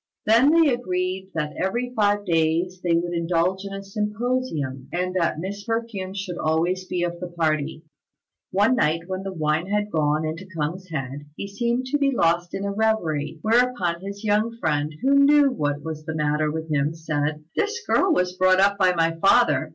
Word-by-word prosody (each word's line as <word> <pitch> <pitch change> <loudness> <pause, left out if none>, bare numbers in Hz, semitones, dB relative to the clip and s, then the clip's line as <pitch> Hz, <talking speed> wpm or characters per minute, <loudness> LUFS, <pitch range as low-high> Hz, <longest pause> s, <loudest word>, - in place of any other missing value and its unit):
Then 230 +6 +5
they 320 -3 +5
agreed 185 -4 -2
that 150 -2 -2
every 240 +6 -2
five 205 -1 +2
days 170 +2 0
they 170 -2 +2
would 175 +1 -1
indulge 175 +3 0
in 200 - -6
a 195 0 -6
symposium, 210 - -2
and 180 +1 -2
that 170 -4 0
Miss 200 +4 -5
Perfume 225 -5 -3
should 190 -3 -5
always 170 +4 0
be 180 -1 -2
of 175 0 -3
the 180 - -5
party. 160 -2 -1 0.7
One 205 +6 +3
night 160 +2 +2
when 185 +1 -4
the 195 0 -5
wine 155 0 -1
had 210 +1 -1
gone 155 0 +1
into 165 +4 -5
K'ung's 175 +5 -3
head, 145 -1 -5
he 200 - -4
seemed 235 +5 -1
to 290 - +1
be 280 -1 +3
lost 175 -8 +1
in 195 - -3
a 200 - -1
reverie; 170 -9 0
whereupon 225 -7 +2
his 200 +2 -7
young 215 +2 +1
friend, 150 -6 0
who 275 +1 +4
knew 285 -1 +5
what 145 - -2
was 155 -1 -6
the 160 +1 -5
matter 150 0 +1
with 160 +1 -5
him, 150 +2 0
said, 155 -1 -2
"This 430 +2 0
girl 380 - +3
was 180 - +1
brought 185 0 +4
up 200 +1 +3
by 185 -2 +4
my 165 -1 +1
father. 240 +7 +3
185 Hz, 190 wpm, -24 LUFS, 160-210 Hz, 0.7 s, Then